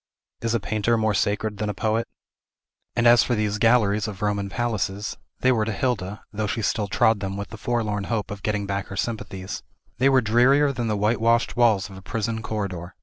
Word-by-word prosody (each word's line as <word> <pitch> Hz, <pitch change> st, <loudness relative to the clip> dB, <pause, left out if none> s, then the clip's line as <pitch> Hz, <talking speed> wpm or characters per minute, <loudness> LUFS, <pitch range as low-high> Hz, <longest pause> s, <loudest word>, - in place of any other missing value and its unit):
Is 115 Hz, 0 st, 0 dB
a -, -, +2 dB
painter 110 Hz, +3 st, 0 dB
more 110 Hz, -1 st, +1 dB
sacred 105 Hz, +1 st, -1 dB
than 105 Hz, -1 st, -1 dB
a 105 Hz, -, -3 dB
poet? 110 Hz, +3 st, 0 dB, 0.9 s
And 120 Hz, 0 st, +1 dB
as 120 Hz, 0 st, +7 dB
for 120 Hz, -, +1 dB
these 105 Hz, -1 st, -1 dB
galleries 110 Hz, -3 st, +3 dB
of 105 Hz, 0 st, -6 dB
Roman 100 Hz, -1 st, 0 dB
palaces, 105 Hz, -3 st, -2 dB, 0.3 s
they 130 Hz, -, +4 dB
were 115 Hz, -4 st, +2 dB
to 110 Hz, -, -2 dB
Hilda, 105 Hz, -3 st, -2 dB
though 105 Hz, 0 st, -1 dB
she 110 Hz, +2 st, -2 dB
still 105 Hz, 0 st, 0 dB
trod 110 Hz, +2 st, +3 dB
them 95 Hz, -1 st, -4 dB
with 100 Hz, 0 st, -5 dB
the 110 Hz, -, -8 dB
forlorn 105 Hz, -4 st, -1 dB
hope 110 Hz, -3 st, -2 dB
of 100 Hz, -2 st, -6 dB
getting 105 Hz, -1 st, -1 dB
back 100 Hz, 0 st, -3 dB
her 95 Hz, -, -7 dB
sympathies, 100 Hz, -4 st, -4 dB, 0.4 s
they 135 Hz, +2 st, +5 dB
were 130 Hz, -1 st, +5 dB
drearier 130 Hz, +6 st, +4 dB
than 120 Hz, -2 st, -2 dB
the 105 Hz, -1 st, 0 dB
whitewashed 115 Hz, +3 st, +2 dB
walls 110 Hz, -5 st, +3 dB
of 95 Hz, -1 st, -11 dB
a -, -, -10 dB
prison 110 Hz, +3 st, -3 dB
corridor. 95 Hz, -5 st, -4 dB
110 Hz, 205 wpm, -24 LUFS, 100-115 Hz, 0.9 s, as